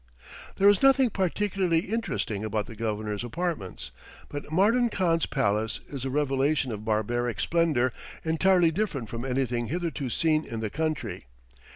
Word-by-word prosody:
There 200 - +4
is 205 -1 +5
nothing 270 -3 +5
particularly 190 -2 +1
interesting 120 - -2
about 110 -1 -1
the 115 - -10
Governor's 105 -1 -3
apartments, 115 - -4 0.4
but 145 +1 -7
Mardan 225 +8 +3
Khan's 170 -5 +1
palace 110 -5 0
is 135 -3 -5
a - - -1
revelation 135 -1 +1
of 105 -1 -5
barbaric 115 +2 -1
splendor 155 -8 +2 0.3
entirely 170 +1 +3
different 155 - -2
from 115 0 -5
anything 125 -3 -1
hitherto 160 -4 -2
seen 155 +4 +2
in 115 - -6
the 110 -2 -3
country. 130 - -3
140 Hz, 145 wpm, -27 LUFS, 115-170 Hz, 0.4 s, is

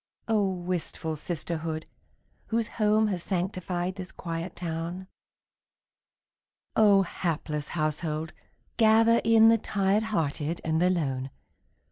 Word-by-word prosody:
Oh, 210 -3 +2
wistful 175 -3 -3
sisterhood, 160 0 -3 0.6
whose 230 -1 0
home 215 0 +2
Has 185 -4 -2
sanctified 180 -1 -2
this 185 -1 -6
quiet 165 0 -5
town! 170 +2 -4 1.7
Oh, 205 -3 +6
hapless 155 -4 -3
household, 155 +1 -2 0.4
gather 225 +1 +5
in 225 0 +6
The 225 0 +4
tired 200 +1 +1
hearted 160 -4 -1
and 160 +1 +1
the 180 - +4
lone! 135 -7 -1
180 Hz, 105 wpm, -28 LUFS, 160-210 Hz, 1.7 s, Oh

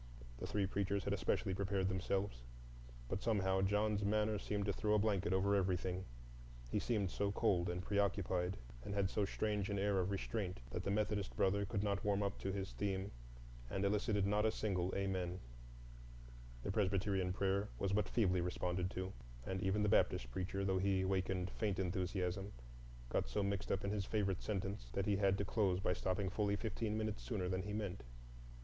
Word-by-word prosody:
The - - -4
three 100 -2 +1
preachers 100 0 0
had 100 - 0
especially 95 0 0
prepared 95 0 0
themselves, 95 -5 -1 0.7
but 95 - -2
somehow 95 -4 +2
John's 105 +1 +2
manner 105 +1 +2
seemed 100 0 -1
to 100 - +1
throw 105 +1 +2
a - - +6
blanket 100 -2 +1
over 95 +2 +3
everything,—he - - -2
seemed 105 -6 0
so 100 0 0
cold 90 -3 +2
and 90 +1 -2
preoccupied, 100 -2 +1 0.3
and 100 - -4
had 95 -2 +1
so 105 - +1
strange 105 0 -1
an 100 - 0
air 100 0 +2
of 90 +1 +1
restraint 100 - -2
that 90 - -2
the - - -1
Methodist 105 -1 0
brother 100 +1 +3
could 100 0 -1
not 100 -1 0
warm 100 0 +2
up 100 0 -2
to 95 - -2
his 95 -5 -3
theme 95 +9 -2 0.6
and 95 +5 0
elicited 105 0 +2
not 105 +1 +2
a 110 - +4
single 95 -4 0
"Amen"; 95 -2 -1 1.2
the - - -1
Presbyterian 95 -2 +1
prayer 100 +2 +1
was 100 -1 0
but 105 +1 +2
feebly 95 -6 +3
responded 90 +1 -1
to, 95 0 -4 0.3
and 95 0 -2
even 100 +2 +2
the - - +3
Baptist 60 -10 +3
preacher, 95 +5 -2
though 95 -1 +2
he 95 -1 +2
wakened 95 -1 0
faint 105 -3 -1
enthusiasm, 95 +1 -1 0.6
got - - 0
so 100 - 0
mixed 100 0 -1
up 95 - 0
in 100 - 0
his 105 -2 -1
favorite 100 -4 0
sentence 100 0 -3
that 100 - 0
he 100 0 +2
had 100 -1 +3
to 100 - 0
close 100 -4 +2
it 95 - -5
by 90 - +2
stopping 95 +2 -1
fully 100 0 +1
fifteen 110 0 -2
minutes 110 -1 -2
sooner 100 -7 -2
than 95 0 0
he 105 +2 -5
meant. 100 -3 -3
100 Hz, 185 wpm, -38 LUFS, 95-100 Hz, 1.2 s, a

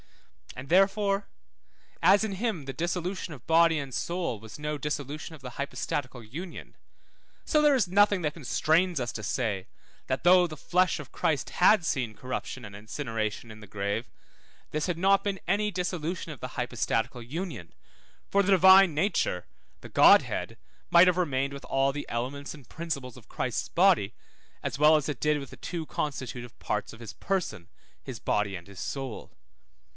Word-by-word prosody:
And 125 +2 -8
therefore 195 +2 +3 0.7
as 195 +5 +6
in 215 -2 -2
him 190 - -2
the 135 - -5
dissolution 175 +3 -3
of 130 - -16
body 165 0 +5
and 135 -2 -6
soul 170 - -2
was 110 0 -11
no 150 0 -3
dissolution 150 +2 -4
of 150 - -16
the 125 -1 -7
hypostatical 135 -1 -4
union, 165 - -8 0.7
so 305 - +3
there 295 -2 +5
is 235 -8 +2
nothing 200 +1 +4
that 150 -1 0
constrains 165 +3 +1
us 120 -2 -2
to 110 - -6
say, 100 -4 -2 0.4
that 130 - -2
though 180 0 +6
the 155 -2 -9
flesh 180 +3 +1
of 150 - -9
Christ 145 -5 -1
had 185 0 +4
seen 120 -8 -1
corruption 130 0 -5
and 100 -1 -10
incineration 110 0 -4
in 110 0 -11
the 105 - -12
grave, 100 +4 -3 0.6
this 155 +2 -1
had 175 -2 -1
not 195 +3 +3
been 200 -2 -2
any 210 +3 +1
dissolution 180 -2 -3
of 145 - -10
the 125 -1 -7
hypostatical 120 0 -1
union, 130 - -6 0.6
for 200 - +4
the 200 - +1
Divine 190 -1 +7
nature, 150 - 0 0.4
the - - -10
Godhead, - - +4 0.3
might 175 +1 +7
have 180 -1 +3
remained 140 -5 0
with 140 - -8
all 135 0 +1
the 145 - -5
elements 130 +5 -4
and 145 -5 -14
principles 140 -7 -5
of - - -16
Christ's - - -2
body, - - +3 0.5
as 140 - -3
well 155 +1 +7
as 150 -2 +1
it 145 -6 -4
did 150 0 +2
with 140 -2 -9
the - - -11
two 170 -3 -5
constitutive 125 -5 -5
parts 105 0 -2
of 115 - -13
his 115 -3 -8
person, 165 - -3 0.3
his - - -7
body 105 -1 0
and 85 0 -9
his 100 -2 -12
soul. 135 -4 -5
150 Hz, 175 wpm, -28 LUFS, 125-180 Hz, 0.7 s, Divine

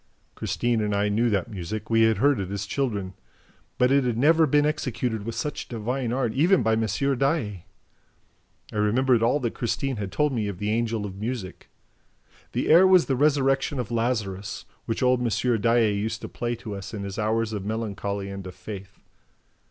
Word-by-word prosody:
Christine 120 -2 -1
and 105 -1 0
I 100 +1 +1
knew 115 +4 +2
that 100 +1 0
music; 105 +3 -5
we 115 0 +4
had 110 -1 +4
heard 140 -4 +3
it 95 -2 -3
as 100 0 -3
children. 100 -5 -2 0.6
But 125 +1 +3
it 140 0 +4
had 120 -3 -1
never 160 +5 +5
been 145 +1 +3
executed 125 -7 -2
with 115 0 -4
such 145 +6 -4
divine 120 +2 -2
art, 125 -3 0
even 170 - +3
by 110 0 +2
M. 110 0 +1 0.3
Daae. 120 - -1 1.1
I - - -8
remembered 115 +4 +3
all 120 +5 +3
that 120 -2 -1
Christine 130 +2 -2
had 100 -2 -4
told 150 +7 +1
me 110 -4 -1
of 100 -3 -4
the 105 +3 -2
Angel 115 -1 -1
of 95 -1 -7
Music. 110 -3 -5 0.8
The - - -1
air 175 +4 +8
was 185 -2 +6
The 135 - 0
Resurrection 135 0 +2
of 120 -3 -3
Lazarus, 105 -5 -2 0.2
which 115 +3 -1
old 125 -1 +3
M. 120 -1 +1
Daae 115 -1 +3
used 105 +2 -2
to - - -5
play 120 0 -3
to 110 -2 -7
us 100 +2 -7
in 100 - -5
his 100 +2 -5
hours 110 +1 0
of 100 -3 -3
melancholy 100 -2 -3
and 100 -1 -7
of 90 - -9
faith. 100 -3 -9
115 Hz, 190 wpm, -25 LUFS, 105-130 Hz, 1.1 s, air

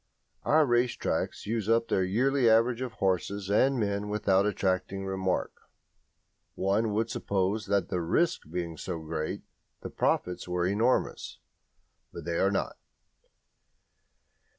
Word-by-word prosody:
Our 155 0 +5
race 120 -1 +2
tracks - - -2
use 110 -1 -2
up 115 0 +3
their 95 - +1
yearly 125 +6 +2
average 115 +2 +3
of 125 -3 -4
horses 95 0 -1
and 130 +5 +3
men 100 -1 -1
without 100 -1 +2
attracting 95 -1 -1
remark. 95 -1 -1 1.0
One 105 +3 +1
would 110 +2 0
suppose 100 +2 -1
that 100 0 +1
the 90 -2 -1
risk 160 - 0
being 85 -1 -4
so 90 0 -4
great 80 0 -4 0.4
the - - -7
profits 90 0 -1
were 90 0 0
enormous; 110 +7 0 0.7
but - - -9
they 85 -1 -1
are 95 - +3
not. 100 - -2
100 Hz, 130 wpm, -29 LUFS, 95-115 Hz, 1.0 s, Our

